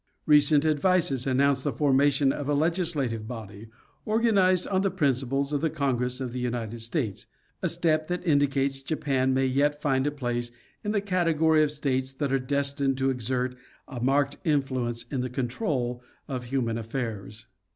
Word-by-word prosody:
Recent 150 0 +5
advices 155 -4 +2
announce 135 +1 +2
the 145 - -1
for 145 -2 +1
mation 140 0 +3
of 145 0 -4
a 145 - +2
legislative 150 - -1
body, 110 -3 -8 0.4
organized 200 -5 +3
on 190 -1 +1
the 195 - +1
principle 140 -5 0
of 145 - 0
the 160 - +1
Congress 125 -4 -1
of 130 -2 -4
the 125 - -4
United 120 -2 -3
States—a 115 - -5
step 155 -2 +1
that 180 +1 -3
indicates 140 -3 +1
Japan 135 -3 0
may 130 0 +2
yet 145 +3 +1
find 135 -2 +1
a - - +1
place 120 -4 -3 0.3
in 210 - -1
the 205 -2 +1
category 165 -5 +2
of 150 - +3
states 135 -3 -2
that 135 0 -2
are 135 - +3
destined 140 0 0
to 135 0 +1
exert 125 +1 -2 0.3
a 125 -4 -7
marked 140 +2 +1
influence 130 -6 0
in 130 - -1
the 125 - -3
control 125 - -2 0.3
of 130 -4 -4
human 120 -3 -1
affairs. 110 -3 -5
135 Hz, 165 wpm, -27 LUFS, 125-150 Hz, 0.4 s, Recent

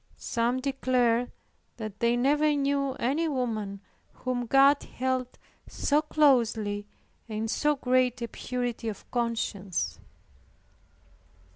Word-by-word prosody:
Some 240 +2 -1
declared 250 -3 +1 0.5
that 215 -3 -7
they 235 +1 +2
never 295 +4 +3
knew 275 -1 0
any 280 +7 0
woman 220 -8 -2 0.3
whom 245 -1 -3
God 275 +3 +5
held 255 0 -3 0.3
so 295 +1 +1
closely, 230 -9 +2 0.4
and 215 - -4
in - - -1
so 295 +6 +1
great 255 -2 +1
a - - -2
purity 245 -2 -3
of 205 - -9
conscience. 205 - -2
250 Hz, 110 wpm, -28 LUFS, 230-275 Hz, 0.5 s, God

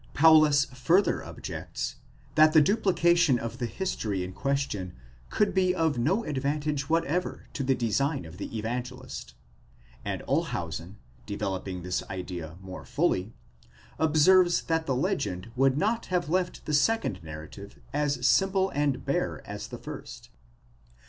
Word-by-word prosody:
Paulus 155 -2 +6
further 130 +11 +2
objects, - - -5 0.4
that 155 0 +6
the 155 - +8
duplication 170 - +3
of 115 +1 -5
the 120 - -1
history 110 - -2
in 90 0 -6
question 135 -8 -2 0.4
could 210 - +1
be 185 -1 +2
of 160 -7 +1
no 185 - +1
advantage 145 -1 -2
whatever 165 +2 0
to - - -3
the 135 0 +2
design 135 - 0
of 80 +2 -11
the 110 - -5
Evangelist; 125 +3 -5 0.7
and - - -3
Olshausen, 85 +5 -2 0.3
developing 95 -3 -3
this 90 0 -1
idea 90 -4 -6
more 95 -1 -8
fully, 95 +5 0 0.6
observes 175 +4 +5
that 165 -1 -1
the 135 - +1
legend 130 - -2
would 135 +1 +3
not 220 +7 0
have 180 -4 0
left 180 +1 -1
the 150 - -2
second 145 - +2
narrative 80 +6 -9 0.2
as 145 0 0
simple 195 0 +3
and 145 -3 0
bare - - -1
as - - -6
the - - -7
first. - - -9
140 Hz, 135 wpm, -28 LUFS, 110-165 Hz, 0.7 s, the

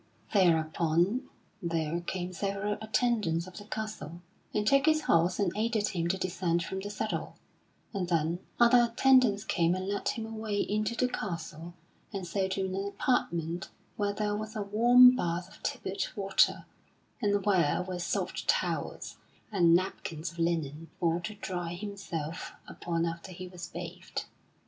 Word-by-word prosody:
Thereupon 170 - +2 0.3
there 165 -1 -1
came 180 +1 -4
several 200 +2 -1
attendants 220 -7 +1
of 185 - -11
the 205 - -8
castle, 210 -7 -6 0.3
and 210 - 0
took 275 +5 +4
his 310 0 +4
horse 175 - +3
and 200 -4 +1
aided 215 -1 +1
him 170 -4 -1
to 190 +3 0
descend 175 -2 0
from 190 +2 -4
the 200 +1 -5
saddle; 215 +1 -3 0.6
and 185 -3 -2
then 165 0 +1 0.2
other 240 0 +6
attendants 245 -5 +5
came 170 -4 +2
and 185 0 -4
led 200 0 -1
him 225 - -3
away 220 -2 -3
into 215 +3 0
the 250 - +2
castle 170 -6 -5 0.4
and 195 -3 -4
so 190 +2 0
to 190 0 -1
an 190 +1 -2
apartment 170 -7 -1 0.3
where 205 -1 0
there 205 0 -1
was 215 +2 -5
a 210 - -1
warm 245 +5 +7
bath 175 -4 -1
of 205 - -17
tepid 190 - -2
water, 195 -2 +2 0.6
and 205 -2 +1
where 180 -4 +3
were 180 -1 -5
soft 175 - -2
towels - - -1 0.3
and 170 -5 +5
napkins 170 -3 -2
of 170 - -13
linen 165 -2 -1
for 170 0 +2
to 210 +5 -6
dry 175 -4 -4
himself 180 -5 -5
upon 170 -1 -2
after 170 +2 -5
he 185 +1 -7
was 175 -2 -8
bathed. 180 +1 -6
190 Hz, 155 wpm, -30 LUFS, 170-210 Hz, 0.6 s, warm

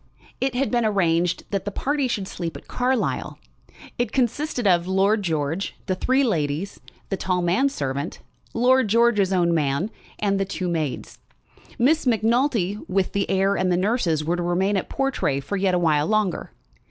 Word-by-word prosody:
It 265 -1 -1
had 270 +2 0
been 240 -1 +2
arranged 175 -4 +1
that 195 -2 -1
the - - -1
party 280 +6 -1
should 205 -6 -2
sleep 170 -3 -5
at - - -16
Carlisle. 250 0 -1 0.6
It 240 -3 0
consisted 255 +1 -1
of 175 -2 +3
Lord 195 +3 +2
George, 160 +1 -2
the 190 - 0
three 260 +8 +1
ladies, 165 - -1 0.3
the 195 - -1
tall 180 -1 -1
man 190 +11 +2
servant, 140 - -3 0.3
Lord 255 +1 +3
George's 215 -3 +3
own 175 -2 +2
man, 155 +6 0 0.3
and 200 -2 0
the - - +2
two 190 -2 -4
maids. 155 -6 -3 0.6
Miss 275 +4 +2
Macnulty, 225 -3 +1
with 185 0 0
the 200 0 -1
heir 195 +1 +2
and 185 -2 +1
the 175 - +2
nurses, 185 -6 0
were 170 +3 0
to - - -2
remain 180 +4 +1
at 190 - -2
Portray 270 - 0
for 140 +9 -4
yet 190 -2 +1
a - - +2
while 155 -3 +2
longer. 215 -3 0
195 Hz, 175 wpm, -23 LUFS, 175-235 Hz, 0.6 s, of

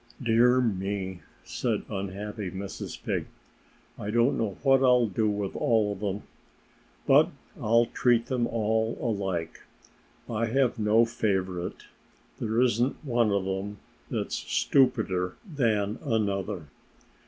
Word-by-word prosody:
"Dear 125 +1 +4
me!" 95 -4 -2 0.2
said - - -2
unhappy 100 +1 -4
Mrs. 95 +2 -6
Pig. - - -2 0.7
"I 100 - -4
don't 120 +4 +3
know 105 -4 -2
what 135 -1 +5
I'll 125 -2 +5
do 110 +1 0
with 100 -2 -3
all 110 -3 +2
of 100 - -10
them. 100 -1 -3 0.8
But - - +6 0.3
I'll 115 +2 +4
treat 120 0 +2
them 125 -2 0
all 110 0 0
alike. 95 -8 -2 0.7
I 115 0 -1
have 125 0 +1
no 110 +2 +4
favorite. 95 -6 -2 0.6
There 110 +1 0
isn't 125 +2 +2
one 120 -4 +2
of 100 -1 0
them 95 +2 -3 0.3
that's - - -2
stupider 95 -9 +1
than 115 - 0
another." 105 - -1
110 Hz, 120 wpm, -27 LUFS, 100-120 Hz, 0.8 s, But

